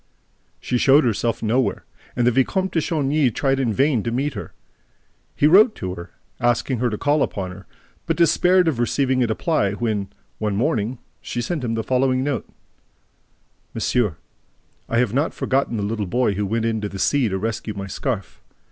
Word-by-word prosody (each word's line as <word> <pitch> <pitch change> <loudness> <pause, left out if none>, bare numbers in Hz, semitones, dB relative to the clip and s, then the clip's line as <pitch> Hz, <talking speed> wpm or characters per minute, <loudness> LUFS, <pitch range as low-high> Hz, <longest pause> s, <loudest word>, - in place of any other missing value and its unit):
She 125 - -1
showed 140 +4 +5
herself 115 -1 -1
nowhere; 120 +4 0 0.3
and 120 - +1
the 125 - +5
Vicomte 185 - +1
de 165 - +1
Chagny 150 -3 +1
tried 135 +4 0
in 125 -4 +1
vain 135 +1 +2
to 115 - -3
meet 135 +5 -1
her. - - -7 0.8
He - - +2
wrote 210 +9 +6
to 95 -1 -4
her, 85 0 -9 0.3
asking 120 +1 +1
to 120 -3 0
call 145 +3 +1
upon 95 -7 -2
her, 95 -1 -12 0.4
but - - 0
despaired 180 +1 +4
of 145 -7 0
receiving 130 +1 +1
a - - +1
reply 110 - 0
when, 105 -3 -2 0.3
one 105 -2 -1
morning, 115 +2 0 0.2
she 120 - -4
sent 155 +3 -2
him 115 -2 -1
the 110 - -2
following 130 +1 +1
note: 145 -1 -2 1.3
MONSIEUR: 105 -10 0 0.7
I 115 - 0
have 115 -3 +2
not 145 +5 0
forgotten 135 -3 0
the 105 - -2
little 105 -1 -2
boy 120 +1 +1
who 100 +1 -2
went 115 +2 -1
into 110 -2 -1
the 100 - -7
sea 130 +4 +2
to 95 - -1
rescue 110 +1 -3
my 100 -1 -5
scarf. 105 +1 -4
120 Hz, 180 wpm, -22 LUFS, 105-135 Hz, 1.3 s, wrote